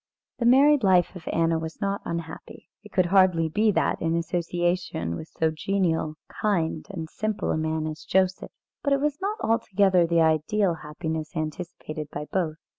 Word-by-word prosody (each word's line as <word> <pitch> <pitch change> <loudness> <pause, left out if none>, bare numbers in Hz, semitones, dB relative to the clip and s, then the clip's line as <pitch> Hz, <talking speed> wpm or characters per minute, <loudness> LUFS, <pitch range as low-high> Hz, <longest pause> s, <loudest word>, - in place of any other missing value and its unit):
The 235 - +2
married 280 +2 +6
life 185 -2 +3
of 175 - -11
Anna 165 0 +2
was 160 0 -6
not 200 -1 -1
unhappy. 170 -1 -7
It 210 - -14
could 185 - +2
hardly 180 -3 +4
be 215 +7 +2
that - - 0
in 165 0 +1
association 175 - -1
with 155 - -7
so 160 0 0
genial, 160 -2 -1 0.3
kind, 170 -6 0
and 165 -5 -5
simple 215 +5 -2
a - - 0
man 160 0 -1
as 155 0 -6
Joseph. 185 0 +1 0.3
But 280 - +1
it 275 - +2
was 295 +2 -1
not 410 +3 -1
altogether 195 -5 +3
the 170 0 +3
ideal 160 +5 +2
happiness 155 +2 -5
anticipated 155 -1 -5
by 150 - -5
both. 170 -5 0
175 Hz, 170 wpm, -26 LUFS, 160-200 Hz, 0.3 s, married